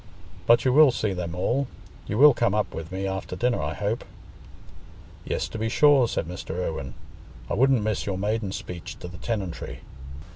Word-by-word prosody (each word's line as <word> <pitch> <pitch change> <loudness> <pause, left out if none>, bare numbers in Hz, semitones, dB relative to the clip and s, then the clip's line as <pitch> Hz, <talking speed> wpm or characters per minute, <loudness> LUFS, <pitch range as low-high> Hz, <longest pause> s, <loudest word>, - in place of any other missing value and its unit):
But 120 +2 +5
you 130 - +3
will 150 0 +8
see 110 -5 -1
them 85 -2 -4
all—you 120 0 -3
will 145 +2 +8
come 115 -4 +1
up 105 - -1
with 80 +1 -7
me 95 +1 -3
after 95 -1 -4
dinner, 120 +5 0
I - - -3
hope?" 105 +3 -2 1.2
"Yes, - - -2
to 110 - -6
be 110 +1 -1
sure," 140 0 +5
said 85 - -2
Mr. 90 -2 -6
Irwine. 80 -7 -4 0.5
"I - - -3
wouldn't 130 0 +3
miss 105 -1 -1
your 95 -2 -1
maiden 105 0 -1
speech 90 -3 -7
to - - -8
the 85 0 -10
tenantry." 100 -6 -4
105 Hz, 180 wpm, -25 LUFS, 90-120 Hz, 1.2 s, will